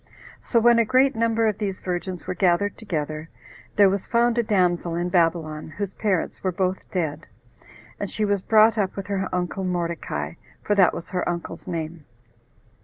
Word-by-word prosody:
So 235 - +1
when 235 +1 +5
a - - +5
great 260 +4 +3
number 225 0 +2
of 215 -2 -1
these 195 -3 -2
virgins 180 0 -4
were - - -2
gathered 180 +2 +2
together, 155 -6 -4 0.5
there 205 -1 +7
was 195 0 -1
found 235 0 +2
a - - +5
damsel 180 -6 +1
in 175 +1 -1
Babylon, 165 -3 0
whose 200 -1 -3
parents 195 -5 -1
were 185 - +1
both 185 +1 0
dead, 160 -3 -3 0.7
and - - -3
she 215 - -1
was 200 -2 +1
brought 220 +2 +5
up 195 -2 0
with 195 - -5
her 195 -2 -2
uncle 180 +1 -2
Mordecai, 175 -2 -2 0.3
for 210 - +1
that 190 -4 +4
was - - -7
her 180 -1 -1
uncle's 170 -1 -5
name. 160 -2 -5
185 Hz, 180 wpm, -24 LUFS, 170-210 Hz, 0.7 s, there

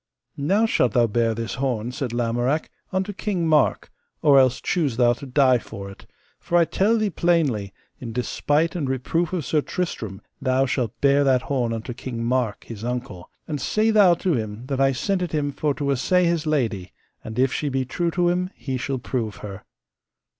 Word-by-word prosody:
Now 195 +11 +2
shalt 125 - +2
thou 120 -1 +4
bear 115 0 +1
this 115 0 -4
horn, 120 -3 -1
said 130 -1 -4
Lamorak, 120 +5 0 0.2
unto 190 +2 -1
King 190 -3 -2
Mark, 155 -3 +2 0.3
or 140 -2 +7
else 130 -2 +3
choose 145 -10 -1
thou 120 -1 +4
to 135 +3 -9
die 130 -1 +4
for 100 -3 -8
it; 95 - -15 0.3
for 175 - 0
I 170 - +5
tell 210 +7 +2
thee 215 -2 0
plainly, 150 - +1 0.3
in 120 -3 -6
despite 145 +7 0
and 145 -7 -2
reproof 155 +6 -1
of 175 -6 -2
Sir 155 - +1
Tristram 115 - -4 0.2
thou 130 +1 +2
shalt 125 -4 -2
bear 140 0 +4
that 130 -2 +3
horn 125 -5 -1
unto 115 +2 -4
King 120 -1 -5
Mark, 120 -3 0
his 110 -2 -9
uncle, 120 -7 -5 0.2
and 150 -4 -3
say 220 +1 +2
thou 200 -5 +6
to 175 0 0
him 110 -1 -3
that 135 0 -2
I 135 0 +4
sent 185 +8 -1
it 180 - -3
him 145 -2 0
for 145 +1 -1
to 140 +1 -1
assay 180 +7 +2
his 170 -2 0
lady, 115 -11 -1 0.3
and 110 0 -7
if 130 +1 +2
she 150 - -1
be 135 -1 -1
true 170 +6 -1
to 175 +1 +1
him 180 +1 0
he 130 -2 -4
shall 135 +2 -2
prove 120 -3 -3
her. 100 -2 -8
135 Hz, 195 wpm, -23 LUFS, 120-165 Hz, 0.3 s, or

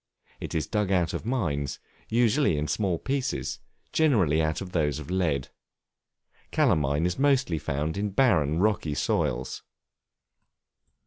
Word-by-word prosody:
It - - -6
is 80 -3 0
dug 105 0 -1
out 90 -3 +1
of - - -4
mines, 75 - -1 0.3
usually 120 - +3
in 75 +1 -1
small 95 +2 0
pieces; 135 +6 -2 0.3
generally 100 - +3
out 80 0 0
of 95 -2 -7
those 75 -5 0
of - - -7
lead. 80 -8 0 1.0
Calamine 80 - +2
is 90 +5 -1
mostly 135 - +2
found 75 +4 -2
in 105 +1 -1
barren, 85 - +2
rocky 90 -6 +1
soils. 65 -2 -1
90 Hz, 130 wpm, -27 LUFS, 75-110 Hz, 1.0 s, usually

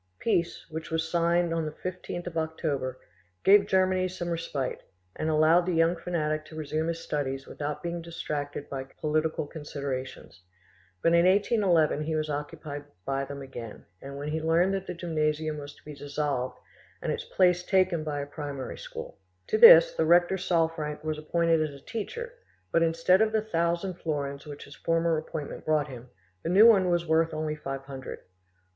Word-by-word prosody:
Peace, 175 -7 0
which 160 0 -6
was 160 0 -1
signed 170 0 +2
an 165 -1 0
the 155 - -3
15th 175 +1 -6
of 175 -2 -6
October, 150 -5 -2 0.4
gave 200 0 +6
Germany 185 -1 +2
some 175 -1 -5
respite, 165 -6 -3 0.3
and 155 - -2
allowed 160 +3 +4
the 180 - +1
young 165 +2 +3
fanatic 155 -3 -2
to 155 - -12
resume 155 +1 -2
his 165 0 -1
studies 135 -4 -3
without 150 0 -5
being 170 0 -3
distracted 145 -4 -5
by 135 -1 -4
political 155 +3 -1
considerations; 140 - -6 0.6
but 165 - +4
in 170 +1 +5
1811 190 -6 +3
he 155 +1 -2
was 155 -1 -1
occupied 145 0 -5 0.2
by 135 0 -1
them 140 0 -7
again, 120 -5 -9 0.2
when 140 +2 -6
he 155 +1 -2
learned 170 +4 +3
that 195 -1 -3
the 180 - -4
gymnasium 155 -2 -1
was 145 0 -9
to - - -23
be 150 - -8
dissolved 145 -2 -3 0.5
and - - 0
its - - -3
place 180 -1 +3
taken 185 -3 +2
by 145 -2 -3
a - - -4
primary 145 -2 -6
school. - - -8 0.3
To 435 - +2
this - - +10
the - - +1
rector 175 +2 +5
Salfranck 165 -4 -1
was 155 -1 -2
appointed 165 +1 +2
as 145 -3 -3
a - - -27
teacher, 470 - -5 0.4
but 165 - +3
instead 165 +4 +3
of 220 0 +3
the 220 -1 +1
thousand 170 -1 -1
florins 140 -2 -3
which 145 -1 -8
his 140 - -12
former 165 0 +1
appointment 155 -2 -6
brought 150 -1 +1
him, 125 -1 -10 0.3
the - - -3
new 195 +5 +7
one 195 -6 +6
was 175 -1 +1
worth 160 0 +2
only 155 0 -2
five 135 -2 -5
hundred. 135 -2 -8
160 Hz, 175 wpm, -28 LUFS, 145-175 Hz, 0.6 s, this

